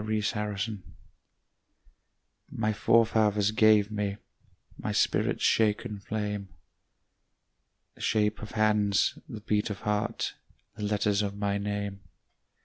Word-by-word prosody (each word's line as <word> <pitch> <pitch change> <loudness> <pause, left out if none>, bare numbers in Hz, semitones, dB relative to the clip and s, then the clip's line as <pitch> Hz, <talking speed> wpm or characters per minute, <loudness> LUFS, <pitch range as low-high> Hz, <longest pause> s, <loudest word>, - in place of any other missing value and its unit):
Driftwood 105 -1 -2 1.7
My 110 -1 -1
forefathers 110 -2 +3
gave 110 -1 +4
me 105 -1 -2 0.6
My - - -4
spirit's - - +1
shaken 105 0 +2
flame, 105 -1 -4 1.4
The - - -16
shape 105 -1 +1
of 110 - -8
hands, 105 -2 +2
the 110 -5 -7
beat 105 0 0
of 100 -3 -5
heart, 105 +2 -1 0.4
The 115 - -9
letters 105 0 +1
of 100 -1 -3
my 100 0 0
name. 100 -1 -3
105 Hz, 105 wpm, -28 LUFS, 100-110 Hz, 1.7 s, gave